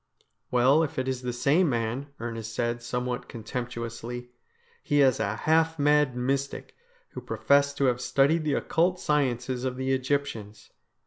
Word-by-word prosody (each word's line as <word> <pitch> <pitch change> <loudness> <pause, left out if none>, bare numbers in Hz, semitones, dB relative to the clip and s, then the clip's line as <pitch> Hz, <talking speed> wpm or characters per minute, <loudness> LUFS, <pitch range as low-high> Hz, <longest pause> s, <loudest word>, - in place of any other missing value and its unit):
' - - -50
Well, 130 +5 +4
if 155 - -2
it 130 0 -1
is 130 -1 -2
the 125 -1 -3
same 140 +8 +2
man,' 120 +3 -2
Ernest 115 -2 -5
said 120 0 -1
somewhat 125 +1 -3
con 115 -2 -8
temptuously, 120 0 -5 0.3
' - - -35
he 145 - +1
is 135 -3 +4
a 100 +2 -1
half 160 +5 +2
mad 145 -3 +3
mystic, 135 +2 -2 0.3
who - - -8
professed 140 0 +2
to 140 - +2
have 125 -1 +1
studied 140 +6 +2
the 150 -2 0
occult 180 +2 +1
sciences 130 -5 0
of 130 -1 -2
the 130 0 0
Egyptians. 130 -6 -3
130 Hz, 170 wpm, -27 LUFS, 120-140 Hz, 0.3 s, Well